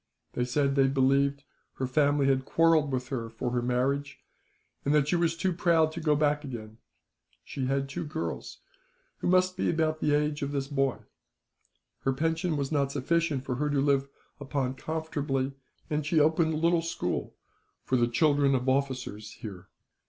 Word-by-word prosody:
They 125 Hz, -, 0 dB
said 140 Hz, +2 st, +1 dB
that 140 Hz, -, +3 dB
they 135 Hz, -, +5 dB
believed 140 Hz, +1 st, +2 dB, 0.3 s
her 130 Hz, -, -2 dB
family 145 Hz, +2 st, +2 dB
had 135 Hz, -1 st, +2 dB
quarrelled 160 Hz, -1 st, +3 dB
with 125 Hz, -1 st, -2 dB
her, 115 Hz, -4 st, -3 dB
for 115 Hz, +2 st, -4 dB
her 120 Hz, 0 st, 0 dB
marriage, 135 Hz, +3 st, -1 dB, 0.7 s
and 145 Hz, +2 st, +2 dB
that 145 Hz, -2 st, +3 dB
she 175 Hz, -, +2 dB
was 170 Hz, -1 st, +1 dB
too 185 Hz, +1 st, 0 dB
proud 165 Hz, -2 st, +3 dB
to 170 Hz, -, -6 dB
go 155 Hz, -2 st, +3 dB
back 150 Hz, 0 st, +1 dB
again. 110 Hz, -5 st, -8 dB, 0.6 s
She 130 Hz, -2 st, -4 dB
had 135 Hz, +1 st, 0 dB
two 170 Hz, +5 st, -4 dB
girls, 155 Hz, +2 st, -5 dB, 0.6 s
who -, -, -2 dB
must 185 Hz, 0 st, +3 dB
be -, -, 0 dB
about 160 Hz, -1 st, 0 dB
the 150 Hz, -1 st, +2 dB
age 150 Hz, 0 st, 0 dB
of 140 Hz, 0 st, -2 dB
this 135 Hz, -1 st, -1 dB
boy. 135 Hz, -2 st, 0 dB, 1.0 s
Her 135 Hz, -, 0 dB
pension 160 Hz, +3 st, 0 dB
was 140 Hz, 0 st, -2 dB
not 140 Hz, -2 st, +1 dB
sufficient 145 Hz, 0 st, 0 dB
for 125 Hz, -2 st, -2 dB
her 150 Hz, +2 st, 0 dB
to 145 Hz, -1 st, +1 dB
live 140 Hz, -1 st, +2 dB, 0.3 s
upon 135 Hz, -2 st, -2 dB
comfortably, 145 Hz, -3 st, -2 dB, 0.4 s
and 150 Hz, 0 st, -1 dB
she 155 Hz, +2 st, +2 dB
opened 160 Hz, +1 st, +3 dB
a -, -, -1 dB
little 170 Hz, +1 st, +3 dB
school 165 Hz, -, -3 dB, 0.5 s
for 130 Hz, -, 0 dB
the 120 Hz, -1 st, +3 dB
children 140 Hz, +2 st, +3 dB
of 125 Hz, 0 st, -2 dB
officers 130 Hz, -6 st, -1 dB
here. 95 Hz, -4 st, -9 dB
140 Hz, 180 wpm, -28 LUFS, 130-155 Hz, 1.0 s, they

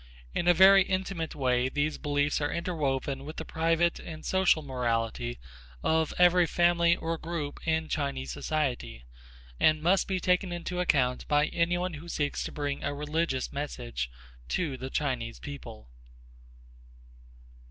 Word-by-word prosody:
In 175 Hz, -, -1 dB
a 175 Hz, -, +7 dB
very 195 Hz, +2 st, +8 dB
intimate 185 Hz, -3 st, -2 dB
way 125 Hz, -2 st, +1 dB
these 145 Hz, +3 st, -1 dB
beliefs 145 Hz, 0 st, 0 dB
are 145 Hz, -, 0 dB
interwoven 140 Hz, -6 st, -2 dB
with 155 Hz, +3 st, -8 dB
the 160 Hz, -, -4 dB
private 165 Hz, +2 st, +1 dB
and 155 Hz, -2 st, -9 dB
social 190 Hz, -4 st, +3 dB
morality 115 Hz, -, -2 dB, 0.5 s
of 160 Hz, -1 st, +2 dB
every 180 Hz, -1 st, +5 dB
family 170 Hz, 0 st, +3 dB
or 165 Hz, -1 st, -3 dB
group 160 Hz, -3 st, -4 dB
in 160 Hz, 0 st, +1 dB
Chinese 140 Hz, -4 st, -2 dB
society, 130 Hz, -, -2 dB, 0.5 s
and 155 Hz, 0 st, +4 dB
must 185 Hz, +3 st, +3 dB
be 190 Hz, -1 st, 0 dB
taken 180 Hz, +1 st, +1 dB
into 175 Hz, +1 st, -4 dB
account 130 Hz, -8 st, +1 dB
by 150 Hz, 0 st, +3 dB
any 170 Hz, +1 st, +1 dB
one 180 Hz, 0 st, -2 dB
who 160 Hz, +3 st, -8 dB
seeks 145 Hz, -3 st, -1 dB
to -, -, -5 dB
bring 145 Hz, -1 st, -3 dB
a 145 Hz, 0 st, -2 dB
religious 150 Hz, -2 st, -1 dB
message -, -, -4 dB, 0.4 s
to 150 Hz, -, -1 dB
the 130 Hz, +1 st, -6 dB
Chinese 125 Hz, -6 st, -2 dB
people. 120 Hz, -, -9 dB
155 Hz, 145 wpm, -29 LUFS, 135-170 Hz, 0.5 s, very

